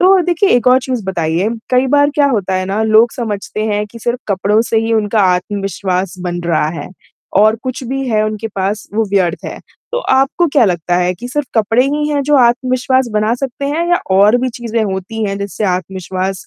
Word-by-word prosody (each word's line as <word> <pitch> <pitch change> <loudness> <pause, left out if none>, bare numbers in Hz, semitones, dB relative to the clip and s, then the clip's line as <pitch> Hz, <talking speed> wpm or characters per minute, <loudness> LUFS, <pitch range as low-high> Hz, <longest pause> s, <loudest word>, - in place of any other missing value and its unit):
तो 380 +1 +6
देखिए 350 +3 +1
एक 245 0 +2
और 255 +1 +6
चीज़ 250 -5 -3
बताइए, 175 +1 -1 0.2
कई 255 +1 +3
बार 285 +2 +3
क्या 290 -1 +3
होता 195 -7 -1
है 185 0 0
ना 200 +3 -1
लोग 220 +2 +4
समझते 215 -3 -4
हैं 210 -1 0
कि 230 +3 -12
सिर्फ़ 240 +2 -2
कपड़ों 200 +2 +2
से 225 - +2
ही 230 - 0
उनका 215 -1 +1
आत्मविश्वास 195 -1 -2
बन 175 -1 -3
रहा 165 -3 +1
है - - -8 0.5
और 215 +1 +4
कुछ 255 0 -4
भी 270 +1 -2
है 215 -2 +2
उनके 215 +1 -3
पास 195 +3 -2
वो 225 +1 +2
व्यर्थ 185 -4 0
है। - - -6 0.3
तो - - 0
आपको 270 +6 +2
क्या 280 - +5
लगता 175 -2 0
है 180 0 +1
कि 245 +8 -8
सिर्फ़ 295 +2 -2
कपड़े 225 +3 +3
ही 295 +2 -1
हैं 290 -2 0
जो 295 +2 +1
आत्मविश्वास 255 +1 +2
बना 215 +2 +1
सकते 265 +1 -4
हैं 330 +4 -1
या 350 - +5 0.2
और 210 +4 +5
भी 255 - 0
चीज़ें 230 -1 -1
होती 200 +3 -3
हैं 200 -1 -2
जिससे 200 +2 -4
आत्मविश्वास 185 0 -3
220 Hz, 210 wpm, -15 LUFS, 195-255 Hz, 0.5 s, तो